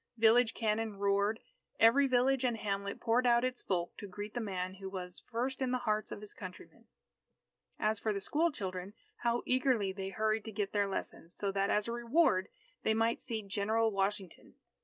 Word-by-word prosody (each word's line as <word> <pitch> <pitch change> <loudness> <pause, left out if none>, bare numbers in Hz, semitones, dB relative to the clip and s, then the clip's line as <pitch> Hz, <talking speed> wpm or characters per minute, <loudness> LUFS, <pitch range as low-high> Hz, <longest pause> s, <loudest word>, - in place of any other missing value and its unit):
Village 230 +1 +5
cannon 220 -1 -1
roared. 200 +2 +1 0.4
Every 270 +5 +6
village 260 +1 +3
and 240 -3 +1
hamlet 200 -1 -3
poured 240 +2 +2
out 240 0 +5
its 255 0 -1
folk 175 -2 -2
to 205 - -7
greet 205 +2 -7
the 240 - -2
man 185 -4 -3
who 195 0 -7
was 180 -2 -7
"first 250 +3 -2
in 260 - +1
the 255 - +1
hearts 215 -3 -1
of - - -6
his 210 - -5
countrymen." 185 -2 -11 0.9
As 215 0 +1
for 215 - 0
the 200 - -1
school 315 +12 +1
children, 190 -5 -5 0.2
how 235 0 0
eagerly 255 -6 +2
they 195 0 -4
hurried 215 +1 0
to 220 - -5
get 205 -1 -2
their 205 -1 +2
lessons, 175 -3 -5
so 200 -1 -1
that 195 0 0
as 210 +1 +2
a - - -2
reward, 235 - +2 0.3
they 220 - +2
might 225 +1 +1
see 225 -4 -3
General 215 +3 +1
Washington. 195 -2 -3
215 Hz, 190 wpm, -33 LUFS, 200-235 Hz, 0.9 s, Every